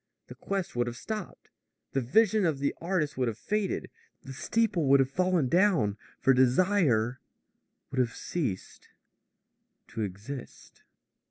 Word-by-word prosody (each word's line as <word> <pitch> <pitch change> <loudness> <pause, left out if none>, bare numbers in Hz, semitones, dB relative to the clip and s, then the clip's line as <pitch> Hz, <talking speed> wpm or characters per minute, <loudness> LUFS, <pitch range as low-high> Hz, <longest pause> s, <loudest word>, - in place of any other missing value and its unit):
The - - -7
quest 195 -7 -4
would 120 0 +1
have 120 0 -5
stopped. 215 +2 -7 0.4
The 135 - 0
vision 215 - +3
of 160 -5 +1
the 140 +1 0
artist 165 -6 -1
would 125 - +2
have 110 -2 -3
faded. 210 - -2 0.3
The 135 - -8
steeple 210 - 0
would 140 +1 +6
have 135 0 +2
fallen 180 -3 +1
down. 170 - +3 0.2
For 135 - +4
desire 130 - +3 0.7
would 135 - -2
have 120 -2 +1
ceased 135 - -4 1.0
to 115 - -5
exist. 105 +7 -7
140 Hz, 140 wpm, -29 LUFS, 125-185 Hz, 1.0 s, would